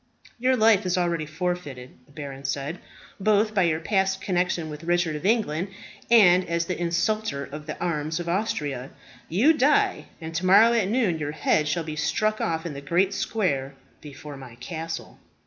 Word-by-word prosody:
"Your 255 +1 +2
life 220 -3 +5
is 180 - +1
already 170 -3 0
forfeited," 155 -6 -4 0.2
the - - -22
baron 140 -2 -8
said, 140 +5 -3 0.4
"both 215 +1 +2
by 200 - +2
your 165 -3 +2
past 190 +1 0
connexion 180 -3 -1
with 150 +2 -8
Richard 175 -2 +1
of 150 +6 -2
England 200 -6 +1 0.4
and 185 -6 +6
as 170 0 0
the 180 - -2
insulter 170 -2 -1
of 150 +1 -9
the 155 - -5
arms 160 -1 -2
of 175 - -5
Austria. 150 - -2 0.4
You 230 - +4
die, 345 +8 +2
and 160 -1 -7
to 165 +3 -2
morrow 220 +5 +7
at 225 -5 +2
noon 210 -8 +1
your 150 0 -3
head 155 0 +1
shall 170 +2 0
be 155 -1 -5
struck 215 +8 0
off 160 0 -1
in 165 - -4
the 140 - -7
great 175 +7 +1
square 180 -10 -1 0.3
before 145 0 -10
my 130 -3 -11
castle." 165 +6 -6
170 Hz, 180 wpm, -25 LUFS, 150-200 Hz, 0.4 s, morrow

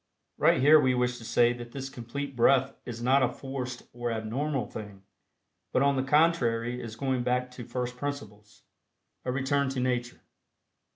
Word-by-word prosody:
Right - - +4
here 150 +4 +7
we 130 -3 +2
wish 125 0 0
to - - -11
say 120 +1 +3
that 120 -1 -9
this 135 -1 -5
Complete 135 +2 -6
Breath 135 +3 +4
is 120 -1 -6
not 135 +3 +4
a 130 - +3
forced 130 -2 -6
or 120 0 -3
abnormal 125 +6 -2
thing, 100 -3 -9 0.7
but 130 - +2
on 140 0 +3
the 130 - +1
contrary 125 -5 +2
is 115 -1 -7
a - - -20
going 130 -1 0
back 125 +1 0
to 125 -1 -9
first 125 -1 -4
principles 105 -7 -7 0.6
a 125 - 0
return 140 +1 +1
to 135 -1 -3
Nature. 125 -1 -2
125 Hz, 175 wpm, -28 LUFS, 120-135 Hz, 0.7 s, here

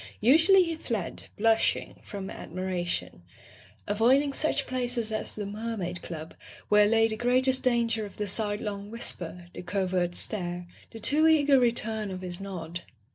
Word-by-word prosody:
Usually 325 - +6
he 335 -2 -3
fled, 225 - -3
blushing, 225 +1 +1
from 195 -2 -7
admira 185 0 -4
tion, - - -3 0.6
avoiding 255 +7 +3
such 295 -1 +1
places 245 -3 -2
as 215 - -3
the 210 - -4
Mermaid 200 -4 -4
Club, 160 -1 -7 0.4
where 210 0 +6
lay 225 +1 +4
the 220 - -3
greatest 255 +3 +3
danger 235 -3 +1
of 205 - -9
the 210 - -2
sidelong 205 0 -1
whisper, 180 -6 -4
the - - -7
covert 180 -1 -1
stare, 175 -4 0 0.2
the 225 - -10
too 300 +8 +3
eager 290 -4 +5
return 225 -3 0
of 185 -1 -6
his 180 0 -6
nod. 175 -3 -6
215 Hz, 150 wpm, -28 LUFS, 185-245 Hz, 0.6 s, Usually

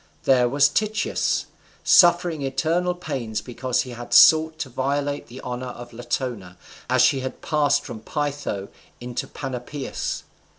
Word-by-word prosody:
There 125 -2 +4
was 145 +2 +4
Tityus 215 +8 0 0.4
suffering 175 -3 +5
eternal 160 +7 0
pains 120 -10 -4
because 125 0 -2
he 125 - -7
had 120 0 -4
sought 160 0 +7
to 130 - -4
violate 140 +3 -2
the 125 +2 -10
honour 125 0 -5
of 120 -1 -9
Latona, 120 -6 -4 0.3
as 130 0 +4
she 135 +1 +3 0.2
passed 145 -2 +2
from 120 -7 -8
Pytho 145 -6 -3 0.3
into 120 0 -5
Panopeus. 135 +1 -5
135 Hz, 130 wpm, -23 LUFS, 120-145 Hz, 0.4 s, sought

